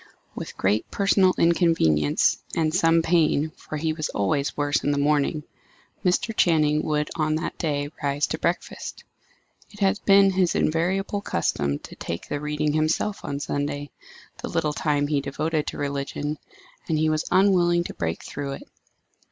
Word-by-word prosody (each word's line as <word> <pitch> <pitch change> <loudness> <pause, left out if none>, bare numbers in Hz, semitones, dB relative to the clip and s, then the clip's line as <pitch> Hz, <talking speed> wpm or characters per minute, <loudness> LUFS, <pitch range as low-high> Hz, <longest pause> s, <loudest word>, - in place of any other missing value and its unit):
With - - -7
great 100 +3 +1
personal 195 -2 +3
inconvenience, 165 - +3 0.2
and 155 -1 +1
some 165 -1 +3
pain 160 -2 +2
for 155 - -7
he 160 +1 -1
was 155 -2 -3
always 140 +8 -1
worse 145 0 +1
in - - +1
the 145 - +1
morning 150 +1 +1 0.6
Mr. 220 +5 +1
Channing 155 -3 +3
would 150 -1 -1
on 155 -1 +1
that 160 - -3
day 145 -2 -1
rise 145 0 +1
to - - -4
breakfast. - - -3 0.7
It 205 - -15
had 195 +1 +2
been 195 -1 +6
his 185 -2 +1
invariable 190 +5 0
custom 70 - -1
to - - -12
take 85 - -5
the 145 - -3
reading 150 0 -1
himself 155 +6 0
on 140 0 -3
Sunday 145 0 -3 0.5
the - - -4
little 160 -3 0
time 145 -1 0
he 145 -1 0
devoted 155 +3 -2
to - - -4
religion 145 +1 -3 0.5
and 160 - +2
he 155 +1 +2
was 155 0 0
unwilling 175 -3 +4
to - - -6
break 80 0 -3
through 140 -1 -5
it. - - -8
155 Hz, 160 wpm, -24 LUFS, 145-170 Hz, 0.7 s, been